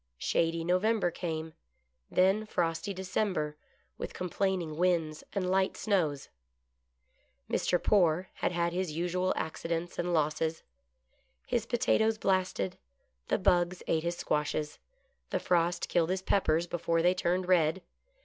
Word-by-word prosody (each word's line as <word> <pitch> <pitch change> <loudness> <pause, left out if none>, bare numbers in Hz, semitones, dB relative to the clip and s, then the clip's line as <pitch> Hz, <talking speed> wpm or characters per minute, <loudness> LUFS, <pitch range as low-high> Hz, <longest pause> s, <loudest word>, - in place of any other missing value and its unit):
Shady 165 - 0
November 185 +2 +2
came; 160 -2 -4 0.6
then 195 +4 +3
frosty 165 0 -1
December, 185 -5 -1 0.4
with - - -5
complaining 180 -3 -1
winds 170 -3 +1
and 195 -3 -1
light 190 +1 +1
snows. 160 -10 0 1.2
Mr. 180 - +1
Poore 180 -1 +3
had - - -1
had 170 -1 0
his 180 -3 -2
usual 180 +3 0
accidents 165 +2 -3
and 175 0 0
losses. 160 0 0 0.8
His 235 -2 -1
potatoes 225 -2 +2
blasted, 185 - 0 0.5
the - - +2
bugs 175 0 +2
ate 160 - +1
his 170 +1 -2
squashes, 150 0 -1 0.5
the - - 0
frost 175 -1 +1
killed 170 -1 +2
his 190 0 -1
peppers 170 -4 +2
before 170 -1 0
they 180 +1 +5
turned 180 0 0
red. 175 0 +3
175 Hz, 125 wpm, -30 LUFS, 165-185 Hz, 1.2 s, they